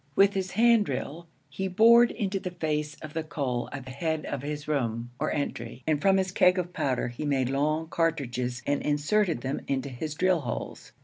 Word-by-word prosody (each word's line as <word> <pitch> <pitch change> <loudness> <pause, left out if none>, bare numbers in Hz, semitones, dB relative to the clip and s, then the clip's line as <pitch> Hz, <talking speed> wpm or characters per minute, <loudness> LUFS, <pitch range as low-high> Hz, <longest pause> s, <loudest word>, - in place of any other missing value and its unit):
With 200 0 +5
his 190 -1 -3
hand 230 0 +4
drill 165 +4 -4 0.2
he 190 +7 -3
bored 230 +5 +6
into 195 -3 -2
the 185 - -4
face 150 -3 -2
of 150 -1 -8
the 160 - -1
coal 135 -6 -3
at 135 -2 -7
the 130 - -8
head 160 +3 -2
of 140 - -4
his 145 +1 -5
room, 120 -5 -1
or - - 0
entry, 135 -3 -4
and 150 -2 +1
from 195 -1 +4
his 190 -1 0
keg 180 0 +4
of 180 -1 -2
powder 130 -6 -1
he 120 +5 -6
made 135 -3 0
long 155 +3 0
cartridges 125 -7 -1
and 145 0 0
inserted 155 - +1
them 135 +3 -3
into 135 0 -1
his 150 +4 -5
drill 185 +1 +2
holes. 125 -5 -6
150 Hz, 200 wpm, -27 LUFS, 135-180 Hz, 0.2 s, bored